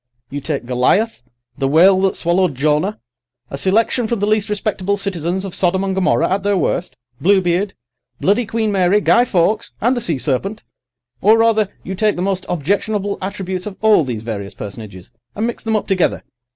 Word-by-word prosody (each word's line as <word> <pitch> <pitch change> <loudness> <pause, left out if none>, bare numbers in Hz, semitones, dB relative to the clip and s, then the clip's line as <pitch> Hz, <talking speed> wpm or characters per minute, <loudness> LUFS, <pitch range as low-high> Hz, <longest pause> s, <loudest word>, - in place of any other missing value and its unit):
You 145 +1 -4
take 140 -4 -3
Goliath, 130 - +1 0.4
the 135 - +1
whale 185 +6 +5
that 195 0 +1
swallowed 175 -3 +1
Jonah, 150 +9 0 0.5
a - - -3
selection 220 - +1
from 235 -1 -1
the 205 - +1
least 215 0 +1
respectable 200 -1 -1
citizens 190 -1 -2
of 190 - -6
Sodom 190 +1 +1
and 195 -1 -1
Gomorrah 190 -1 +2
at 195 +2 0
their 200 -1 +1
worst, 180 0 -1 0.3
Bluebeard, 190 +2 +2 0.4
Bloody 210 +4 +1
Queen 225 -1 -1
Mary, 195 +1 +3
Guy 240 +3 +4
Fawkes, 205 -1 0
and 245 +4 +2
the 240 - -2
sea 165 -8 -1
serpent—or, 195 - -1
rather, 225 -3 +3
you 190 - -5
take 210 +2 +1
the 175 - -3
most 190 -1 -2
objectionable 200 +5 -1
attributes 190 0 -4
of 200 - -7
all 215 -6 +5
these 120 -5 -4
various 100 -4 -5
personages, 100 -3 -9 0.2
and 215 - -1
mix 235 - -4
them 220 -1 0
up 215 - 0
together. 190 -3 0
190 Hz, 180 wpm, -18 LUFS, 170-210 Hz, 0.5 s, whale